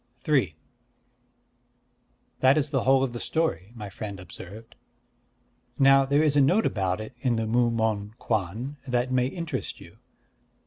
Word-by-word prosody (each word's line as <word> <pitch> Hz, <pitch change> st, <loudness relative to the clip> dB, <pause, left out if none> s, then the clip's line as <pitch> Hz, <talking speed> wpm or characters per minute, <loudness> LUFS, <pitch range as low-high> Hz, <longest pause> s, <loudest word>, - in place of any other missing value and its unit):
III 130 Hz, -, +2 dB, 1.8 s
"That 130 Hz, +3 st, +5 dB
is 145 Hz, -1 st, 0 dB
the 135 Hz, -4 st, 0 dB
whole 135 Hz, 0 st, +5 dB
of 130 Hz, -3 st, -2 dB
the 120 Hz, -, -5 dB
story," 115 Hz, -, -1 dB
my 105 Hz, -3 st, -7 dB
friend 100 Hz, 0 st, -7 dB
observed. 100 Hz, +4 st, -11 dB, 1.0 s
"Now 135 Hz, 0 st, +6 dB
there 140 Hz, +3 st, +3 dB
is 150 Hz, -2 st, +2 dB
a 145 Hz, -, +5 dB
note 185 Hz, +11 st, +3 dB
about 95 Hz, -1 st, 0 dB
it 110 Hz, +3 st, -7 dB
in 120 Hz, -2 st, +1 dB
the 115 Hz, 0 st, -1 dB
Mu 120 Hz, +2 st, +2 dB
Mon 110 Hz, -2 st, -1 dB
Kwan 110 Hz, +7 st, -2 dB
that 125 Hz, 0 st, 0 dB
may 125 Hz, -1 st, +2 dB
interest 170 Hz, +3 st, -4 dB
you. -, -, -15 dB
120 Hz, 150 wpm, -26 LUFS, 110-135 Hz, 1.8 s, Now